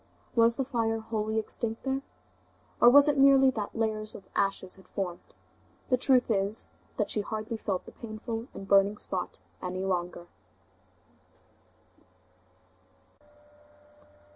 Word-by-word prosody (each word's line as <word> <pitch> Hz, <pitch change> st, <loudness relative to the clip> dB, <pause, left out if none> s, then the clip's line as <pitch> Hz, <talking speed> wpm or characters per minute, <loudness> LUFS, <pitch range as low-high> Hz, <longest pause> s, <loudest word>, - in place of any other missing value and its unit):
Was 230 Hz, 0 st, +5 dB
the 270 Hz, -, -1 dB
fire 225 Hz, -3 st, 0 dB
wholly 220 Hz, 0 st, -2 dB
extinct 225 Hz, +1 st, -2 dB
there? 270 Hz, 0 st, -1 dB, 0.8 s
Or 240 Hz, -, +8 dB
was 285 Hz, +3 st, +8 dB
it 290 Hz, -2 st, +2 dB
merely 270 Hz, -1 st, +7 dB
that 215 Hz, -5 st, -5 dB
layers 215 Hz, -1 st, -2 dB
of 195 Hz, -, -10 dB
ashes 195 Hz, -2 st, 0 dB
had 190 Hz, -, -17 dB
formed? 180 Hz, -4 st, -4 dB, 0.7 s
The 255 Hz, -, +5 dB
truth 255 Hz, -1 st, +3 dB
is, 200 Hz, +1 st, -1 dB, 0.3 s
that 210 Hz, -, 0 dB
she 210 Hz, -, 0 dB
hardly 215 Hz, +2 st, -4 dB
felt 195 Hz, -4 st, -3 dB
the -, -, -11 dB
painful 225 Hz, +1 st, -6 dB
and 195 Hz, -, -8 dB
burning 200 Hz, +1 st, +4 dB
spot 185 Hz, -3 st, -4 dB, 0.2 s
any 185 Hz, +1 st, -3 dB
longer. 175 Hz, -2 st, -2 dB
220 Hz, 125 wpm, -29 LUFS, 195-240 Hz, 0.8 s, Or